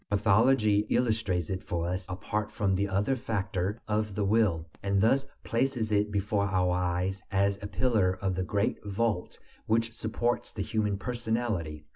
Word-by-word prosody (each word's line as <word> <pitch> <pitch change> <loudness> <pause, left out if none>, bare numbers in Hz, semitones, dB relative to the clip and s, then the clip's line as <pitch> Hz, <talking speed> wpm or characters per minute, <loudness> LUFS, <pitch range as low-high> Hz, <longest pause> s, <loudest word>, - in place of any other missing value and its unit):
Pathology 105 +1 +3
illustrates 110 -7 +1
it 95 0 -2
for 85 -1 -2
us 90 +1 -3
apart 105 +3 -3
from 100 -2 0
the 100 +2 0
other 100 +7 +1
factor 100 -4 -2
of 105 -1 -1
the 105 0 0
will, 100 -6 +2 0.2
and 100 0 +1
thus 135 +6 +3 0.2
places 115 -2 0
it 105 0 +2
before 100 0 0
our 90 -2 +1
eyes 90 +2 -1
as 100 +1 +2
a 100 - -4
pillar 100 -6 +1
of 95 -1 0
the 95 - -1
great 100 +2 -1
vault 105 -2 -1 0.3
which 115 +1 +1
supports 120 +2 -1
the 100 - -3
human 105 -2 0
personality. 110 -9 -2
100 Hz, 160 wpm, -29 LUFS, 95-110 Hz, 0.3 s, Pathology